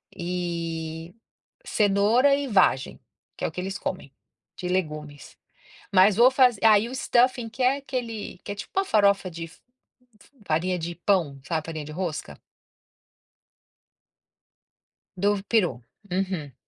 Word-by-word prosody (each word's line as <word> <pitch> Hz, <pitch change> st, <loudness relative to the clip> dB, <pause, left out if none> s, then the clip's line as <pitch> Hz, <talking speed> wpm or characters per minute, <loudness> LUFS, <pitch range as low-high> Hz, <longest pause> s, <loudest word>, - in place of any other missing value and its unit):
e 170 Hz, -2 st, -4 dB, 0.5 s
cenoura 215 Hz, +7 st, +3 dB
e 285 Hz, 0 st, -2 dB
vagem, 190 Hz, -, +2 dB, 0.4 s
que -, -, -9 dB
é -, -, +2 dB
o -, -, -6 dB
que 170 Hz, -, -7 dB
eles 190 Hz, +2 st, -4 dB
comem, 185 Hz, -7 st, -5 dB, 0.4 s
de 180 Hz, -, -5 dB
legumes, 150 Hz, -5 st, -4 dB, 0.6 s
mas 190 Hz, +1 st, +5 dB
vou 245 Hz, +3 st, +7 dB
fazer 250 Hz, -5 st, +3 dB
aí 220 Hz, 0 st, +5 dB
o 255 Hz, -, -7 dB
stuffing 245 Hz, -2 st, +2 dB
que 245 Hz, +3 st, -5 dB
é 255 Hz, +2 st, +4 dB
aquele 235 Hz, -8 st, -5 dB
que -, -, -4 dB
é -, -, -5 dB
tipo 205 Hz, -, -9 dB
uma 390 Hz, -, +2 dB
farofa 200 Hz, -, +2 dB
de 165 Hz, 0 st, -7 dB
f 165 Hz, +2 st, -14 dB, 0.6 s
f -, -, -21 dB, 0.2 s
farinha 175 Hz, +4 st, 0 dB
de 170 Hz, +1 st, -5 dB
pão, 175 Hz, -6 st, 0 dB
sabe, 160 Hz, +1 st, -2 dB
farinha 160 Hz, -2 st, -5 dB
de 150 Hz, -, -9 dB
rosca. 155 Hz, -, -5 dB, 2.8 s
Do 200 Hz, +1 st, 0 dB
peru, 180 Hz, -, +1 dB, 0.3 s
uhum, 180 Hz, -6 st, -2 dB
185 Hz, 140 wpm, -25 LUFS, 165-220 Hz, 2.8 s, vou